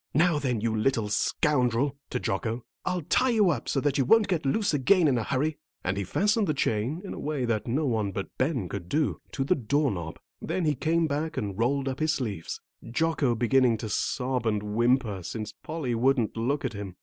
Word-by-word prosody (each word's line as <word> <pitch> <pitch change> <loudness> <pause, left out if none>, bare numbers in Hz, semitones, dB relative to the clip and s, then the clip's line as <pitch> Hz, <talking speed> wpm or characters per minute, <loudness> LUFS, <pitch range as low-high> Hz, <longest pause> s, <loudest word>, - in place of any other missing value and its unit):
"Now 160 0 +4
then, 125 -6 -1
you 115 0 0
little 110 -1 +1
scoundrel," 130 +3 +1
to 125 - -2
Jocko, 115 +4 -2 0.2
"I'll 180 -2 -1
tie 255 - +2
you 215 -6 +4
up 130 -7 -3
so 135 - +1
that 145 0 +1
you - - +4
won't 225 - +5
get 165 -7 0
loose 200 +6 +1
again 160 +5 +4
in 135 - +3
a 115 - 0
hurry," 145 +5 -1 0.2
and 95 +1 0
he 100 - -2
fastened 210 - +1
the 155 - 0
chain, 130 - -1
in - - -5
a - - -7
way 145 -4 -2
that 110 -2 -1
no 140 +6 0
one 110 -6 0
but 95 0 -5
Ben 130 - 0
could 90 -2 -6
do, 155 0 0
to 135 - -1
the 140 - +3
door 140 0 +1
knob, 85 -4 -5 0.2
then 185 - -1
he 150 - +3
came 160 +5 +1
back 155 +2 -2
and 100 -3 -2
rolled 135 +4 +1
up 130 0 -3
his 155 0 +2
sleeves, 105 - -4 0.3
Jocko 140 -2 +1
beginning 120 0 +3
to 110 0 -5
sob 125 +1 -1
and 105 -2 0
whimper, 120 -3 +2
since 105 +5 -5
Polly 155 -6 -3
wouldn't 120 -1 +2
look 130 +5 -1
at 125 - -2
him. 100 -3 -6
130 Hz, 215 wpm, -27 LUFS, 110-155 Hz, 0.3 s, won't